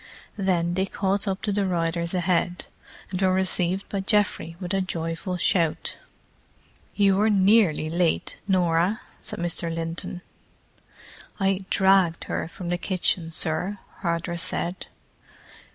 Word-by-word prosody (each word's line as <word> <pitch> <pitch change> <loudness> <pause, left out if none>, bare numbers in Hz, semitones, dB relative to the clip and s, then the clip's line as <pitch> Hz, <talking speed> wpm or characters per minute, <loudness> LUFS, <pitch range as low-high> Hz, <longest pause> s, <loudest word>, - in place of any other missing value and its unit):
Then 175 -3 +1
they 190 +2 0
caught 195 +1 -1
up 190 -1 -2
to 210 - 0
the 200 -1 +1
riders 170 0 -1
ahead, 180 0 0 0.5
and 185 0 -2
were 190 -1 +4
received 185 0 +1
by 200 - -3
Geoffrey 200 -5 +1
with 180 0 -4
a 195 - +2
joyful 170 0 -3
shout. 170 -2 0 1.0
"You 195 -2 +4
were 215 +2 +3
nearly 195 -6 +4
late, 170 +1 0
Norah," 180 +1 +2 0.2
said - - -5
Mr. 170 -1 -1
Linton. 165 +2 -4 1.2
"I 195 -1 +1
dragged 190 -4 +3
her - - -3
from 175 +1 -7
the 175 0 -1
kitchen, 180 -3 0
sir," 160 +5 0 0.2
Hardress 170 0 -1
said. 175 +2 0
180 Hz, 130 wpm, -25 LUFS, 170-195 Hz, 1.2 s, were